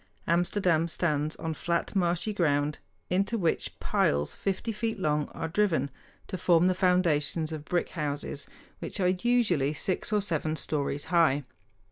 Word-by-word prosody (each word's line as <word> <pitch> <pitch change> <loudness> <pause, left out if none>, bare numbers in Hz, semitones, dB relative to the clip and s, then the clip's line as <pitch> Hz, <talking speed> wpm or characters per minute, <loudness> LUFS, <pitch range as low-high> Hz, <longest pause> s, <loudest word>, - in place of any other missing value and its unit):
Amsterdam 170 -1 +2
stands 155 -2 0
on 160 -1 -3
flat, 170 +5 -2
marshy 180 +3 +1
ground 150 -5 +1 0.3
into 195 +5 +1
which 170 -6 0
piles 70 +1 +1
fifty 195 +4 -2
feet 225 +1 -2
long 150 -5 0
are 165 - -4
driven 160 -7 +1 0.3
to 185 - -5
form 170 -1 +4
the 185 - +4
foundations 170 -4 +1
of 155 -2 -6
brick 175 +1 0
houses, 145 -2 -4 0.3
which - - -4
are 180 -1 +3
usually 185 - +2
six 185 +6 -2
or 210 - +3
seven 160 -4 -1
stories 145 -1 -2
high. 155 -5 +4
170 Hz, 145 wpm, -28 LUFS, 150-185 Hz, 0.3 s, form